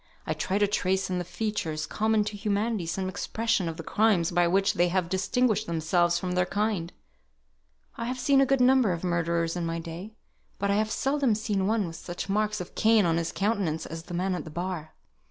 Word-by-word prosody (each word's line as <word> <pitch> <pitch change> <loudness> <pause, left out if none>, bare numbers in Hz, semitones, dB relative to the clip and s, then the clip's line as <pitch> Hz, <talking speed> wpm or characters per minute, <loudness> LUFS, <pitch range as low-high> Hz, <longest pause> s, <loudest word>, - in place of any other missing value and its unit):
I - - -1
try 190 - -1
to 205 - +4
trace 190 -2 0
in 180 - 0
the - - -2
features 175 -4 -3
common 220 0 +1
to 210 0 -5
humanity 205 -2 -1
some 185 +3 -2
expression 205 -1 -1
of 165 - -6
the 165 - -6
crimes 205 -3 +2
by 175 0 +3
which 195 +3 +2
they 175 +1 +3
have 180 -1 0
distinguished 215 +5 +1
themselves 170 +1 +2
from 185 - -3
their 180 0 +1
kind. 200 -4 -1 1.1
I 230 - -3
have 250 +2 -3
seen 270 +2 +4
a - - +5
good 270 -1 +2
number 250 -6 +5
of 170 - -5
murderers 170 -1 0
in 175 - -2
my 165 0 -2
day, 170 +6 -7 0.4
but 200 0 0
I - - +2
have 215 0 +1
seldom 270 -1 +1
seen 205 -3 -1
one 215 -1 +1
with 165 -1 -7
such 175 +3 -6
marks 210 +1 0
of 180 - -7
Cain 220 -2 +4
on 165 -1 +2
his 170 -1 -1
countenance 195 -6 -1
as 165 +1 -6
the 175 +1 -7
man 185 +2 0
at 180 - -3
the - - -9
bar." 170 -1 -5
190 Hz, 215 wpm, -27 LUFS, 170-215 Hz, 1.1 s, a